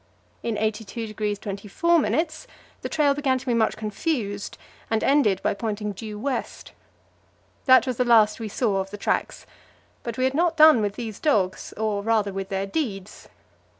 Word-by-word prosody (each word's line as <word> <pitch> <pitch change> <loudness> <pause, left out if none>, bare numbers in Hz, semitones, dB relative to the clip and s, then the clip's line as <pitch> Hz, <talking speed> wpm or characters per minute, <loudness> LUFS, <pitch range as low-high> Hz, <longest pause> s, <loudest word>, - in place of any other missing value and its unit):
In 230 -2 -2
82° 215 -1 -3
24' 210 - 0 0.8
the - - -4
trail 295 -3 +3
began 275 -2 +1
to 255 - -9
be 245 - 0
much 225 -1 +1
confused, 210 -2 -3 0.3
and 225 -1 0
ended 265 -10 +3
by - - +2
pointing 210 0 -3
due 210 +1 -7
west. 265 +4 -4 0.9
That 260 -1 +6
was 255 -3 -3
the 250 - +3
last 225 -3 +4
we 225 - -4
saw 205 -2 0
of 190 0 -2
the 205 - -7
tracks; - - -2 0.6
but 235 -2 -6
we 255 - 0
had 260 +1 +2
not 335 +2 +1
done 310 -6 +7
with 205 -1 -1
these 225 -4 -6
dogs, 200 -12 0
or 215 -1 -1
rather 210 -2 +1
with 195 0 -5
their 195 0 -1
deeds. 200 -5 -4
220 Hz, 165 wpm, -24 LUFS, 205-260 Hz, 0.9 s, done